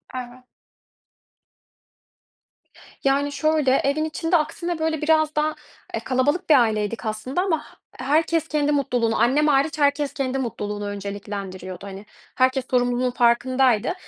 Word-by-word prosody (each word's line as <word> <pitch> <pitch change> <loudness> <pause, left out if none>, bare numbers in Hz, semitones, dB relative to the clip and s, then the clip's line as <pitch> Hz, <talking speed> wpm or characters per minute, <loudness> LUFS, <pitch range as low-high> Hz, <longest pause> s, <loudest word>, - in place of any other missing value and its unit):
Evet. 250 0 -7 2.6
Yani 280 +1 +2
şöyle: 310 -2 +1
Evin 295 +3 +1
içinde 325 +2 +1
aksine 335 +2 -3
böyle 315 -1 -1
biraz 310 0 +2
daha, 305 0 0 0.4
eee, - - -1
kalabalık 290 +8 0
bir 305 - +8
aileydik 220 0 -1
aslında 220 +9 -2
ama 365 -4 +1 0.3
he - - -10
herkes 320 +3 +1
kendi 295 -1 0
mutluluğunu 245 -5 0
annem 290 +5 +3
hariç 285 +1 +2
herkes 285 0 +1
kendi 270 -1 -2
mutluluğunu 210 -4 -4
önceliklendiriyordu. 200 -2 -6
Hani, 195 +1 -9 0.3
herkes 260 0 +2
sorumluluğun 245 0 +1
farkındaydı. 245 -1 +2
265 Hz, 125 wpm, -23 LUFS, 235-305 Hz, 2.6 s, bir